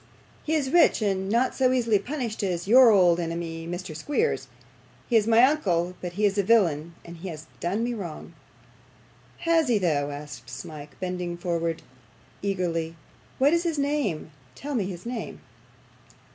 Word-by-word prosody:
'He 315 - 0
is 275 -4 0
rich, 345 +1 +5
and 190 -1 0
not 235 +4 +2
so 255 -1 +2
easily 230 -5 +2
punished 245 -2 -4
as 180 -3 -2
YOUR 250 +2 +8
old 180 -5 +5
enemy, 165 -1 -4
Mr. 175 -2 -5
Squeers. 295 - -1 0.6
He 240 - 0
is 220 -1 +4
my 230 +1 +6
uncle, 180 - +2
but 180 -1 -5
he 210 +3 +1
is 200 0 +1
a - - +3
villain, 170 -7 +2
and 170 0 -10
has 165 -3 -7
done 195 +6 -1
me 240 +1 -1
wrong.' 180 -8 -7 1.1
'Has 330 -2 +3
he 235 -3 +3
though?' 150 -7 0
asked 145 -4 -8
Smike, 145 +3 -9
bending 180 -1 -3
eagerly 170 -1 -2 0.6
forward. 170 -4 -2 0.4
'What 280 +4 +4
is 340 - +3
his 335 -3 -1
name? 280 - -1 0.2
Tell 290 - -6
me 220 -7 0
his 180 0 -7
name. 240 -1 -5
190 Hz, 160 wpm, -26 LUFS, 170-245 Hz, 1.1 s, YOUR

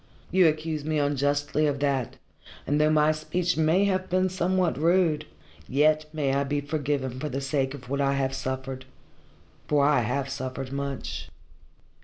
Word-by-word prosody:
You 185 -2 +5
accuse 155 -1 -1
me 155 +1 -1
unjustly 145 +1 +1
of 145 -1 0
that, 140 -4 0 0.5
and 145 +2 +1
though 155 - +4
my 155 0 +4
speech 155 +3 -1
may 160 +5 +3
have 185 -1 0
been 185 +1 +2
somewhat 185 -2 0
rude, 165 -2 +2 0.4
yet 155 +3 +3
may 145 -4 0
I 140 +1 +2
be 145 +1 -1
forgiven 140 -3 -2
for 150 +2 -3
the 135 0 -3
sake 135 0 -1
of 125 -2 -12
what 140 +2 -1
I 140 0 +2
have 135 -1 0
suffered. 130 0 -4 0.8
For 145 -2 +3
I 145 -2 +4
have 125 +4 -1
suffered 130 -1 -5
much." 135 - -4
145 Hz, 165 wpm, -26 LUFS, 135-155 Hz, 0.8 s, You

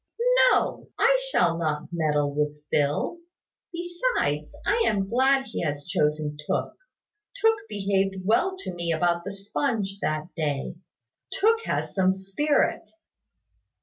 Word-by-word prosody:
"No; - - 0
I - - +4
shall 170 - +2
not 155 -2 -2
meddle 150 -4 0
with 150 0 -2
Phil. 145 - 0 0.5
Besides, 345 - -1
I 455 +3 +2
am 195 -2 +1
glad 265 +4 +3
he - - -5
has 145 -3 -3
chosen 150 0 0
Tooke. - - -2 0.6
Tooke 450 -2 +3
behaved 195 -1 -1
well 365 - +2
to 185 - -5
me 170 -1 -2
about 170 +1 +1
the 200 - -5
sponge 200 0 -2
that 155 +1 -2
day. 145 -4 -2 0.6
Tooke 450 +3 +2
has - - -2
some 190 -1 +3
spirit." 195 +11 0
190 Hz, 125 wpm, -26 LUFS, -, 0.6 s, I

